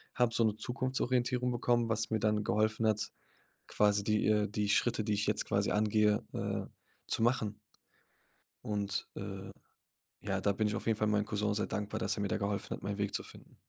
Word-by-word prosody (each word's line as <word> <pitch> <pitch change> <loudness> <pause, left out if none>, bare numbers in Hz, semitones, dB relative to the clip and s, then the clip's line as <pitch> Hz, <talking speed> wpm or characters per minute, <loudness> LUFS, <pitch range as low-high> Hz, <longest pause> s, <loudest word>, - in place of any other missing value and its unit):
habe 120 -2 +2
so 115 0 +3
'ne 110 -1 +1
Zukunftsorientierung 125 0 0
bekommen, 120 -1 +1
was 110 0 0
mir 110 - +1
dann 105 0 +1
geholfen 110 +2 +2
hat, 105 -1 0 0.6
quasi 105 -1 +2
die, 105 +1 +1
äh 105 -1 +3
die 105 0 -1
Schritte, 110 +1 +2
die 105 - +1
ich 105 +1 0
jetzt 105 0 +1
quasi 100 0 +1
angehe, 105 0 +3
äh, - - -2 0.4
zu 115 - 0
machen. 110 -4 +1 1.1
Und, 100 -2 -2
äh, 95 -1 -6 0.7
ja, - - -2
da 100 - +3
bin 105 +2 +1
ich 105 - -1
auf - - -5
jeden 110 - +2
Fall 110 - +1
meinem 105 -1 +2
Cousin 105 -1 0
sehr 105 0 -1
dankbar, 105 +1 -3
dass 115 - -1
er - - -2
mir - - +1
da - - 0
geholfen 100 -1 -2
hat, - - -4
meinen 100 0 -3
Weg 100 -1 -1
zu - - -1
finden. - - -15
105 Hz, 200 wpm, -33 LUFS, 105-115 Hz, 1.1 s, so